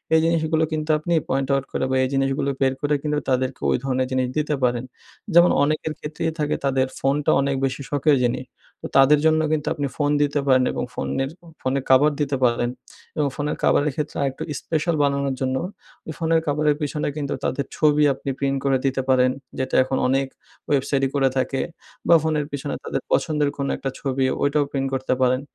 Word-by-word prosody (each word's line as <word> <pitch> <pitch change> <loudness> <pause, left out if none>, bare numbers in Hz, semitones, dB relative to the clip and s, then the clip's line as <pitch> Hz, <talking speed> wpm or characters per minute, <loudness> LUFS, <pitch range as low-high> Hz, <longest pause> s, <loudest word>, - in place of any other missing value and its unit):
এই - - +6
জিনিসগুলো 160 -1 +1
কিন্তু 155 0 -3
আপনি 170 +2 -2 0.2
পয়েন্ট 135 +1 0
আউট 135 0 0
করে, - - -1
বা - - +1
এই 130 - 0
জিনিসগুলো 135 +1 0
বের 130 0 +3
করে, 145 0 +1
কিন্তু 150 -1 0
তাদেরকে 130 0 0
ওই - - +3
ধরণের 130 -1 0
জিনিস 130 -1 +1
দিতে 150 -1 0
পারেন। 120 -1 +1 0.5
যেমন 175 +1 +7
অনেকের 155 +1 -1
ক্ষেত্রেই 160 +2 -3
থাকে 150 0 0
তাদের 130 -1 +2
ফোনটা 140 +2 +1
অনেক 140 0 0
বেশি 135 +1 -3
শখের 145 +1 +3
জিনিস 120 +1 0 0.4
তো - - -3
তাদের 140 +2 +6
জন্য 160 0 +4
কিন্তু 155 -2 -1
আপনি 145 -2 -2
ফোন 145 -1 +1
দিতে 145 0 +1
পারেন, 130 -1 +5
এবং - - -3
ফোনের 135 0 -2 0.3
ফোনে 130 +1 0
কভার 140 +3 +6
দিতে 140 -1 0
পারেন 120 0 +2 0.5
এবং 150 - +2
ফোনের 150 0 -2
কভারের 145 0 +3
ক্ষেত্রে 150 -1 -4
আরেকটু 135 -1 -2 0.2
স্পেশাল 160 +1 -1
বানানোর 140 -1 0
জন্য, 130 0 0 0.5
ওই 160 - -4
ফোনের 165 -1 +2
কভারের 150 0 +2
পিছনে 150 +1 -2
কিন্তু 140 -2 -2
তাদের 140 +1 -1
ছবি 150 -1 +4
আপনি 135 +1 -6
প্রিন্ট 140 0 0
করে 135 -1 +3
দিতে 135 0 +1
পারেন। 130 -1 +4 0.3
যেটা 130 0 -1
এখন 130 0 -2
অনেক 135 +1 +1 0.4
ওয়েবসাইটই 135 -1 +1
করে 135 -1 +3
থাকে, 135 +1 0 0.5
বা 170 - +7
ফোনের 155 -2 0
পিছনে 145 0 -4
তাদের - - -3
পছন্দের 150 -2 +1
কোনো 140 -1 -2
একটা 135 - -3
ছবি, 135 -1 0 0.2
ওইটাও 145 +1 +2
প্রিন্ট 135 -1 -1
করতে 130 -1 0
পারেন। 130 +1 +3
140 Hz, 190 wpm, -23 LUFS, 135-150 Hz, 0.5 s, যেমন